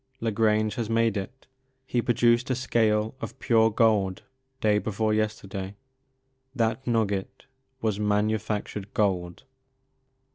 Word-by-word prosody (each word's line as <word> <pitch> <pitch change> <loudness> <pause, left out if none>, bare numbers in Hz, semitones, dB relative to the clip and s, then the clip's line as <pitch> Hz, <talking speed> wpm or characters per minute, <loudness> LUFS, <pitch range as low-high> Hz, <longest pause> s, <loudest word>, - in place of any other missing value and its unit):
La 115 -1 -1
Grange 110 0 +2
has 115 -2 -2
made 115 -1 +2
it. 100 +7 -6 0.4
He 125 -2 0
produced 120 +1 +2
a 130 - +1
scale 110 -4 +1
of - - -6
pure 115 -3 +3
gold 105 -4 +2 0.4
day 105 -1 +3
before 110 +1 -1
yesterday. 100 -2 -3 0.8
That 115 +1 -1
nugget 105 -5 -1 0.4
was 110 -2 0
manufactured 105 -1 -1
gold." 90 -3 0
110 Hz, 115 wpm, -26 LUFS, 105-115 Hz, 0.8 s, pure